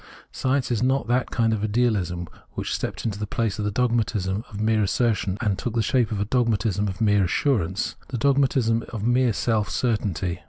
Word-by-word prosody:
Science 130 0 0
is 115 - 0
not 130 +1 +1
that 125 +1 +1
kind 115 -1 +1
of 105 -1 -2
Idealism 105 -6 0 0.3
which - - -3
stepped - - -4
into 105 -3 -2
the 105 - -3
place 110 0 -1
of 105 - -1
the - - +1
Dogmatism 110 -3 0
of 105 - -8
mere 110 0 +2
assertion 105 -1 +1
and 105 -4 0
took 120 -2 -3
the 115 - +2
shape 120 0 +1
of 105 - -2
a 100 - 0
Dogmatism 105 -4 +1
of 95 +3 -5
mere 105 -2 +4
assurance, 95 - 0
the 125 - -4
Dogmatism 130 -3 +2
of 110 -4 -5
mere 120 0 +3
self 110 0 0
certainty. 100 -7 -1
110 Hz, 195 wpm, -24 LUFS, 100-120 Hz, 0.3 s, mere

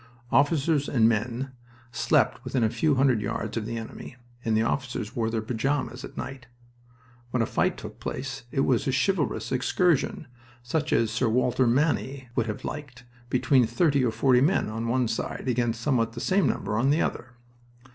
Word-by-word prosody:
Officers 145 0 +2
and 115 -4 +4
men 120 +4 -1 0.4
slept - - +1
within 130 -3 0
a 110 - +2
few 155 +1 +2
hundred 130 -4 +3
yards 105 0 -3
of 110 -2 -2
the 115 0 -3
enemy, 115 +2 -8 0.3
and 110 -1 +1
the 110 - +3
officers 120 -3 -2
wore 115 -2 0
their 110 -1 -2
pajamas 130 +5 -2
at - - -10
night. 130 -2 -6 0.8
When 125 -1 +1
a - - +1
fight - - 0
took - - -9
place 135 0 -5
it 135 -1 +1
was 130 +1 +1
a - - +2
chivalrous 135 - 0
excursion, 150 +4 +1 0.4
such 155 +5 -1
as 115 -2 +2
Sir 115 +1 +1
Walter 125 +2 +2
Manny 135 0 0
would 115 -3 +1
have 105 - -5
liked, 135 -5 -7 0.3
between 125 -1 +3
thirty 140 +3 +2
or 125 - +2
forty 125 +1 +3
men 160 - +2
on 115 +2 -3
one 125 +1 +1
side 110 - -4
against 120 -2 0
somewhat 115 -4 +1
the - - -6
same 195 +1 +2
number 105 - -1
on 130 +3 +2
the 150 +3 +3
other. 130 +1 -4
125 Hz, 180 wpm, -26 LUFS, 115-140 Hz, 0.8 s, and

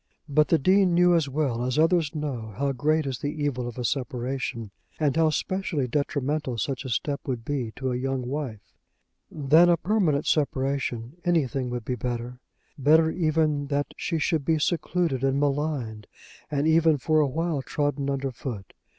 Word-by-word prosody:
But 150 +1 +3
the 165 - +4
Dean 185 +3 +3
knew 175 0 +5
as 160 -5 +2
well 135 -4 -1
as 125 +2 -1
others 165 0 +2
know 125 -9 -4
how 140 0 0
great 155 +4 +1
is 130 -4 -3
the - - -3
evil 145 -5 -2
of 120 - -7
a 125 - -3
separation, 125 -4 -3 0.3
and 150 -3 +1
how 160 -1 +4
specially 155 -3 -1
detrimental 140 -1 -1
such 135 +1 -2
a - - -4
step 140 +5 -1
would 120 -4 -3
be 130 -6 -2
to 130 -1 -2
a - - -1
young 130 0 -2
wife. 125 -7 -5 0.6
Than 155 +4 +4
a 170 - +4
permanent 170 -6 +1
separation 135 -2 -1
anything 140 -7 0
would 120 -2 -4
be 125 - -1
better; 125 0 -4 0.4
better 160 +4 +5
even 155 -4 +1
that 145 0 -2
she 165 - -2
should 160 -1 0
be 160 +2 +2
secluded 165 -3 0
and 135 +1 +2
maligned, 140 -7 -1 0.4
and 145 -1 0
even, 160 -1 +4
for 155 +3 +2
a 150 - +3
while, 160 +1 -1
trodden 145 0 -1
under 135 -1 -1
foot. 115 -5 -7
140 Hz, 175 wpm, -26 LUFS, 130-155 Hz, 0.6 s, knew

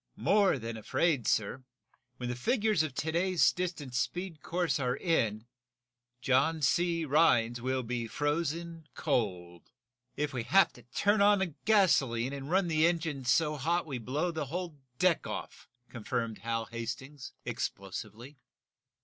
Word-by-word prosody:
"More 200 -6 +3
than 115 -2 -5
afraid, 140 +4 0
sir. 110 +5 0 0.5
When 125 - -4
the 125 - -2
figures 215 - +1
of 155 -5 -3
to 160 +4 -2
day's 180 +1 +3
distance 160 -9 -3
speed 175 -4 -3
course 175 -2 -1
are 125 -1 0
in 115 - 0 0.8
John 140 +5 +2
C. 170 +3 +2
Rhinds 120 -6 +3
will 130 +1 -1
be 120 0 -3
frozen 165 +4 -2
cold!" 90 - -2 0.5
"If 150 0 -1
we 125 - -2
have 195 +12 +4
to 125 - -15
turn 200 - +1
on 200 -4 +4
gasoline 140 - +3
and 140 0 -6
run 190 +1 +2
the 160 0 +3
engines 160 -7 -2
so 150 +3 +2
hot 170 +5 0
we 135 -5 -4
blow 145 +9 -1
the 160 -4 -4
whole 170 0 -5 0.2
deck 180 -2 +2
off!" - - -7 0.2
confirmed 115 -1 -3
Hal 115 0 -2
Hastings, 125 +5 -7
explosively. 110 +7 -5
145 Hz, 140 wpm, -31 LUFS, 120-170 Hz, 0.8 s, have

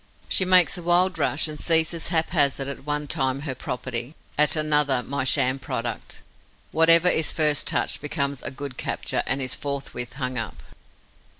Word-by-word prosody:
She 190 - +1
makes 180 0 +4
a - - -8
wild 175 +1 +2
rush 150 +1 0
and 150 -1 -7
seizes 165 0 +2
haphazard 155 -5 +1
at 140 -1 -7
one 150 0 -2
time 135 -2 -1
her 140 -3 -4
property, 125 +2 -4 0.2
at 150 +2 +3
another 150 -4 +2
my 140 +1 -3
sham 130 0 +2
product. 115 -3 -5 0.5
Whatever 165 +2 +6
is 160 -3 +2
first 150 -2 +1
touched - - 0
becomes 140 -2 -3
a - - -5
good 140 -1 -8
capture - - -2
and 135 +1 0
is 130 - -3
forthwith 140 -4 -5
hung 130 -2 -4
up. 115 - -7
145 Hz, 165 wpm, -24 LUFS, 130-160 Hz, 0.5 s, Whatever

